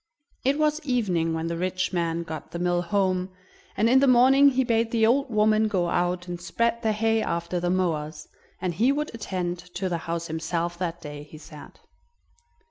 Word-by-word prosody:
It 275 +2 +2
was 305 0 +1
evening 185 - 0
when 160 0 -3
the 170 0 -2
rich 185 +1 -2
man 170 -1 -1
got 160 -2 -7
the - - -6
mill 175 0 +1
home, 185 0 0 0.5
and 215 +3 +3
in 255 +3 +5
the 275 - +3
morning 265 +3 +6
he 260 -1 +1
bade 230 -2 +1
the 225 -1 +2
old 270 +4 +2
woman 215 0 +3
go 180 -5 0
out 180 +1 -1
and 175 -1 -6
spread 230 +7 -1
the 220 -2 +1
hay 225 +1 +1
after 170 0 -2
the 175 0 -1
mowers, 160 -4 -2 0.3
and 180 -2 -2
he 235 +10 +3
would 295 0 -2
attend 180 -5 -3 0.2
to 190 +1 -2
the 170 -1 -2
house 170 0 -2
himself 165 +2 -3
that 170 -1 -3
day, 145 -1 -8
he 150 +1 -12
said. 155 -1 -13
185 Hz, 195 wpm, -25 LUFS, 170-230 Hz, 0.5 s, morning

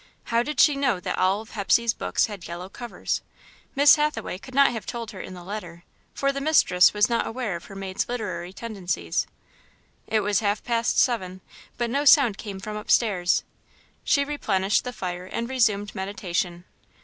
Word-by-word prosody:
How 230 0 +1
did 290 +3 -4
she 295 -1 +6
know 270 -8 +1
that - - -3
all 190 +3 +2
of 220 - -14
Hepsey's 225 +2 +2
books - - 0
had 205 -5 -8
yellow 175 +2 -7
covers? 240 +4 -4 0.5
Miss 285 +2 +7
Hathaway 300 -10 -1
could 260 +4 -12
not 275 -1 +6
have 225 -5 -6
told 230 -2 -5
her 190 - -8
in 185 - -8
the 175 - -10
letter, 175 -3 -7 0.3
for 275 0 +1
the 275 0 -4
mistress 230 - +5
was 210 0 +3
not 235 -1 0
awire 225 -5 -3
of 170 - -14
her 195 - -11
maid's 195 +1 -3
literary 185 -8 -4
tendencies. 190 - -3 0.8
It 220 -1 +1
was 205 -1 +1
half 205 -1 -1
past 235 -1 0
seven, 190 -7 +1 0.4
but 240 -1 -1
no 280 +3 +1
sound 260 -8 +6
came 200 -3 -6
from 210 +2 -6
upstairs. 205 -4 +2 0.6
She 280 -1 +2
replenished 205 -10 0
the 250 - -3
fire 180 -5 -5
and 230 +4 -3
resumed 215 -6 +1
meditation. 185 -2 -3
210 Hz, 180 wpm, -25 LUFS, 185-240 Hz, 0.8 s, Miss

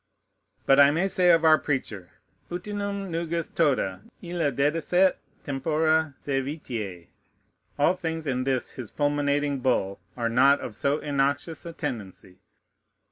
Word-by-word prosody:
But 135 +1 +5
I 140 0 +8
may 165 +6 +1
say 180 -2 +2
of 165 -1 +5
our 155 -1 +6
preacher, 110 - -3 0.4
"Utinam 200 +1 -4
nugis 165 0 -2
tota 130 - +1 0.2
illa 170 -4 -1
dedisset 150 +6 -1 0.2
et - - -12 0.2
tempora 155 +2 +1
sævitiæ." 130 - -4 0.7
All 150 +5 +4
things 165 -3 -4
in 130 -3 -1
this 130 -2 -1
his 125 -5 -8
fulminating 145 -1 0
bull 110 -7 0 0.2
are 120 -1 0
not 135 +4 +4
of 110 - -6
so 140 +7 0
innoxious 145 +3 -1
a 170 - -7
tendency. 95 - -6
145 Hz, 135 wpm, -26 LUFS, 130-165 Hz, 0.7 s, I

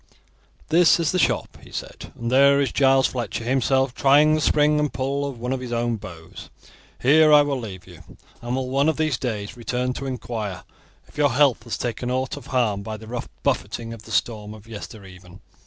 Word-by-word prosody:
"This 170 +2 +5
is 165 -3 +1
the 185 - 0
shop," - - 0
he - - -15
said, - - -7
"and 120 0 -4
there 140 +2 +5
is 140 -2 0
Giles 135 -1 +4
Fletcher 120 -2 -3
himself 130 +1 +1
trying 145 +4 +4
the 155 - +1
spring 150 0 +3
and 150 -1 0
pull 140 +2 -2
of 130 - -9
one 125 +2 -2
of 130 - -3
his 125 -1 -7 0.3
bows. 85 -4 -11 0.5
Here 155 +4 +5
I 150 -1 +8
will 140 -2 -2
leave 95 -6 -8
you, - - -14 0.4
and 120 +1 -3
will 130 -1 -2
one 140 +3 +3
of 160 - -1
these 155 -4 0
days 110 -3 -4
return 125 +1 -2
to 135 - -5
inquire 115 -7 -5 0.4
if - - -13
your 145 -4 +3
health 135 -2 +3
has 115 - -3
taken 120 0 -3
ought 130 0 -1
of - - -11
harm 115 -6 0
by 110 +2 -6
the 110 - -12
rough 120 +2 -6
buffeting 115 -1 -2
of 115 - -10
the 110 - -13
storm 105 -2 -1
of 105 0 -15
yester 110 -1 -9
even." 90 0 -14
125 Hz, 205 wpm, -23 LUFS, 115-140 Hz, 0.5 s, I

